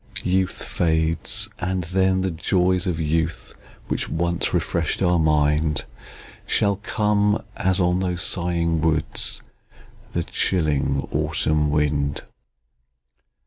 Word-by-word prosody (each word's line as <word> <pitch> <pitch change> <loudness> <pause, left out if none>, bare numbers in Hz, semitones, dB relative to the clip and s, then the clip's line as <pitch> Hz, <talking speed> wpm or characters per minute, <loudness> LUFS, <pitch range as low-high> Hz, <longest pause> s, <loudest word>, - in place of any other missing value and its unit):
Youth 95 0 0
fades; 80 -1 +1
and 95 -1 -2
then, 95 +2 +1
the 95 0 -1
joys 90 +2 +1
of 85 -3 -1
youth, 80 +1 -1 0.3
Which - - -2
once 85 +1 -1
refresh'd 85 +2 -1
our 90 -1 +3
mind, 75 -1 +2 0.6
Shall 100 -2 +1
come, 105 0 +1
as, 95 0 +1
on 90 0 +2
those 90 -2 -1
sighing 85 -2 +1
woods, 80 -1 +1 0.7
The - - 0
chilling 75 -5 0
autumn 75 -1 +1
wind. 75 -1 0
85 Hz, 105 wpm, -23 LUFS, 80-95 Hz, 0.7 s, our